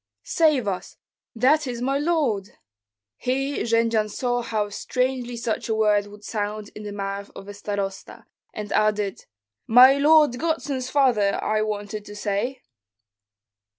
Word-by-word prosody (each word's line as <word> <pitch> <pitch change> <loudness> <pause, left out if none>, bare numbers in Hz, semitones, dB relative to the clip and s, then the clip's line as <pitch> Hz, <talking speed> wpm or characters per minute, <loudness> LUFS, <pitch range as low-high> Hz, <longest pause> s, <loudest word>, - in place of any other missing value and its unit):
"Save 305 -9 +2
us! 185 -2 -4 0.4
that 275 +5 +3
is 240 -2 -4
my 270 +3 0
lord!" 285 - -1 0.6
Here 270 +3 -1
Jendzian 230 -2 +1
saw 245 +3 -1
how 215 -3 -2
strangely 250 +2 -2
such 230 -1 -3
a 220 - +1
word 210 -2 +2
would 205 0 -14
sound 210 0 -4
in 210 - -9
the 210 -1 -6
mouth 200 0 -5
of 195 - -10
a 205 - -7
starosta, 200 -1 -5 0.3
and 210 -1 -7
added, 210 -2 0 0.4
"My 255 +4 +7
lord 295 -4 +5
godson's 275 -5 -2
father, 245 -8 +2
I 215 0 +1
wanted 210 0 -4
to 205 - -10
say." 210 +6 -2
225 Hz, 140 wpm, -24 LUFS, 205-260 Hz, 0.6 s, My